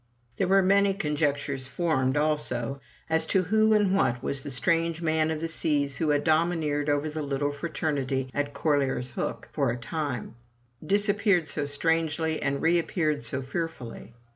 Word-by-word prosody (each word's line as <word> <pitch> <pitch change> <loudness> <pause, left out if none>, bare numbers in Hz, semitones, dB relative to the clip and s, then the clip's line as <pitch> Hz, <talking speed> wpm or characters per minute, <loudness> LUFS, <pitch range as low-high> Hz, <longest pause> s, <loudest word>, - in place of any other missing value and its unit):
There 190 - +1
were 195 +1 +4
many 200 +1 +3
conjectures 145 -5 -1
formed, 135 -3 0
also, 140 -4 -1 0.3
as 160 0 +1
to 190 - +2
who 220 +4 +3
and 200 -2 +3
what 125 -9 +1
was 140 -1 -1
the 145 - -6
strange 165 +6 +1
man 160 -1 +1
of 160 -1 -2
the 165 - -1
seas 145 -4 0
who 160 0 0
had 145 -1 +2
domineered 155 -2 +1
over 145 +1 +1
the 155 0 -4
little 145 0 -1
fraternity 140 -3 -2
at 145 0 -1
Corlaer's 135 -5 0
Hook - - -4
for - - 0
a 120 - -2
time; 130 -2 -4 0.5
disappeared 200 -1 +2
so 145 -2 +1
strangely, 160 +1 0
and 140 0 -1
reappeared 165 -3 +1
so 130 +4 -2
fearfully. 135 -6 -6
150 Hz, 160 wpm, -27 LUFS, 140-165 Hz, 0.5 s, were